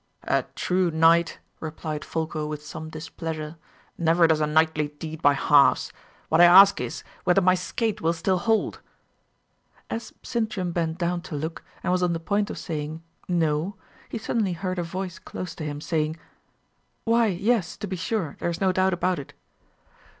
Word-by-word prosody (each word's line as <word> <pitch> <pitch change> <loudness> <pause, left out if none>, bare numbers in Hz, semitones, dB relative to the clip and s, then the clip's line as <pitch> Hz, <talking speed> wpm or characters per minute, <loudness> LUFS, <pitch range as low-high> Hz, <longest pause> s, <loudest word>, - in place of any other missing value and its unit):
"A - - +1
true 180 -1 +1
knight," 165 +1 +4 0.2
replied 155 -1 -5
Folko, 155 -2 -3
with 150 0 -6
some 155 +1 -7
displeasure, 160 0 -6 0.4
"never 170 0 +4
does 160 -1 +3
a 150 - +2
knightly 155 0 +2
deed 160 +1 -7
by 145 -2 +5
halves. 140 0 +4 0.3
What 160 +2 +4
I - - +10
ask 195 +3 +8
is, - - -5 0.2
whether 180 +2 +4
my 185 -1 +4
skate 215 +4 -2
will 165 +1 +2
still 180 +3 0
hold?" 225 +3 +1 1.1
As 230 - -4
Sintram 215 -6 -2
bent 165 -1 -1
down 175 0 -1
to 175 -3 -7
look, 160 +3 -4 0.2
and - - 0
was 180 0 +2
on 175 -1 +2
the 165 - -2
point 205 +4 0
of - - -5
saying 155 0 -5 0.2
"No!" 165 +1 0 0.3
he - - -4
suddenly 215 -3 -1
heard 185 +1 -3
a - - 0
voice 185 +1 -5
close 180 -3 -6
to 155 - -7
him, 145 -1 -4
saying, 155 0 -1 0.9
"Why, 230 0 +3
yes, 195 0 0
to 205 - -4
be 190 -1 -4
sure; 180 -3 -2
there - - -1
is 170 - -3
no 190 -1 +3
doubt 185 +1 +2
about 180 0 0
it." 140 - -10
170 Hz, 175 wpm, -25 LUFS, 160-185 Hz, 1.1 s, I